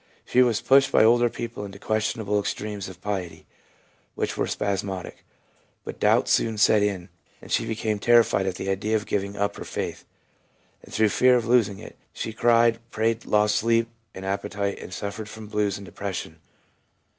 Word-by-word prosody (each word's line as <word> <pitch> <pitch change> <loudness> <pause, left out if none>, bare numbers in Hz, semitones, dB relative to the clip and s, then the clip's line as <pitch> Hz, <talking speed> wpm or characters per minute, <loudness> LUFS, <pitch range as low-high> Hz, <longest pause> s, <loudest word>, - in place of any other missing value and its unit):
She 125 - +3
was 120 -4 +2
pushed 135 +1 +4
by - - +5
older 120 +2 +5
people 115 -2 -6
into 100 -1 -8
questionable 110 0 -1
extremes 100 -1 -4
of 90 -1 -13
piety, 95 -4 -4 0.7
which - - -2
were - - -1
spasmodic. 95 -2 -3 0.6
But - - -7
doubts - - +3
soon 110 -1 +2
set 105 0 +5
in, 100 -3 -1 0.3
and - - -13
she - - +1
became 110 -1 -2
terrified 115 -4 +4
at 95 - -2
the 95 - -5
idea 105 +3 0
of 110 -1 -1
giving 100 0 -2
up 100 0 -1
her - - -6
faith; - - -5 0.8
and - - -16
through 110 0 +2
fear 125 +5 +4
of 120 -2 +1
losing 115 -4 +3
it, - - -12
she 110 - -5
cried, 115 0 +3
prayed, 115 0 -1
lost 105 0 +2
sleep 115 +1 +2 0.3
and 95 - -7
appetite, 100 0 -2
and - - -9
suffered 105 +2 -5
from 110 0 -9
blues 105 -2 -1
and 100 - -10
depression. 95 -3 -6
105 Hz, 175 wpm, -25 LUFS, 100-115 Hz, 0.8 s, by